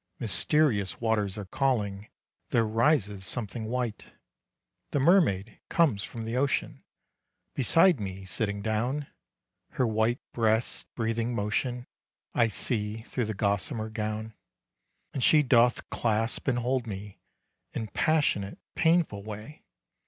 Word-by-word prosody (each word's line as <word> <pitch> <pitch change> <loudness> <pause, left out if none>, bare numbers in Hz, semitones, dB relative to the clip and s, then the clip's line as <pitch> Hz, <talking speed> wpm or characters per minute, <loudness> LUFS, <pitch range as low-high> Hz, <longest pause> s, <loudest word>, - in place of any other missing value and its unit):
Mysterious 115 - +2
waters 110 -4 0
are 105 - -5
calling, 105 -3 -1 0.4
There 115 -1 +2
rises 110 -3 +1
something 110 +1 0
white. 120 -1 -3 0.8
The 145 - 0
mermaid 130 - +3
comes 140 -13 +2
from 115 - -6
the 115 +2 -3
ocean, 135 +2 -1 0.7
Beside 165 - +4
me 95 -1 -6
sitting 100 +1 -1
down; 120 +7 -1 0.7
Her 130 - +1
white 110 +2 +1 0.2
breast's 110 0 +1
breathing 115 +1 -1
motion, 120 +4 -1 0.5
I 120 - +3
see 105 0 -1
through 120 0 -2
the 110 -1 -4
gossamer 100 +2 -1
gown. 110 0 -4 0.8
And 130 - -2
she 150 -1 +6
doth 120 -2 +3
clasp 115 +2 0
and 130 -3 +2
hold 125 0 -1
me, 100 -1 -7 0.5
In 110 - -3
passionate, 105 -4 +1 0.2
painful 160 - +2
way. 110 +8 -9
115 Hz, 120 wpm, -28 LUFS, 105-125 Hz, 0.8 s, she